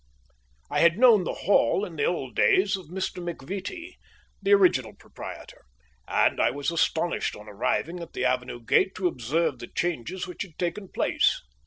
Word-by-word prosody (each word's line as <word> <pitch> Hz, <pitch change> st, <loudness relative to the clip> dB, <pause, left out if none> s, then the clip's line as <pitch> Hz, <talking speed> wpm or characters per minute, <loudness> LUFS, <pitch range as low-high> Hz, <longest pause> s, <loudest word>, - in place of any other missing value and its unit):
I -, -, +1 dB
had 170 Hz, +2 st, +5 dB
known 225 Hz, -6 st, +6 dB
the -, -, -2 dB
Hall 200 Hz, +1 st, +3 dB
in 175 Hz, -5 st, -9 dB
the 145 Hz, -, 0 dB
old 135 Hz, -10 st, -2 dB
days 195 Hz, +1 st, +4 dB
of 190 Hz, -4 st, -9 dB
Mr. 185 Hz, +1 st, -4 dB
McVittie, 195 Hz, -, -6 dB, 0.4 s
the 200 Hz, 0 st, 0 dB
original 200 Hz, -3 st, +4 dB
proprietor, -, -, -10 dB, 0.4 s
and -, -, +2 dB
I -, -, +4 dB
was 145 Hz, +3 st, -2 dB
astonished 170 Hz, 0 st, 0 dB
on 105 Hz, +1 st, -12 dB
arriving 120 Hz, -, -2 dB
at 170 Hz, -, -9 dB
the 125 Hz, -, -2 dB
avenue 125 Hz, -1 st, -1 dB
gate 190 Hz, -, +3 dB
to 185 Hz, -1 st, 0 dB
observe 145 Hz, +1 st, -1 dB
the 120 Hz, -, -7 dB
changes 175 Hz, +2 st, -3 dB
which 180 Hz, -, -8 dB
had 170 Hz, -5 st, -7 dB
taken 185 Hz, +3 st, -3 dB
place. -, -, +1 dB
175 Hz, 170 wpm, -26 LUFS, 145-190 Hz, 0.4 s, known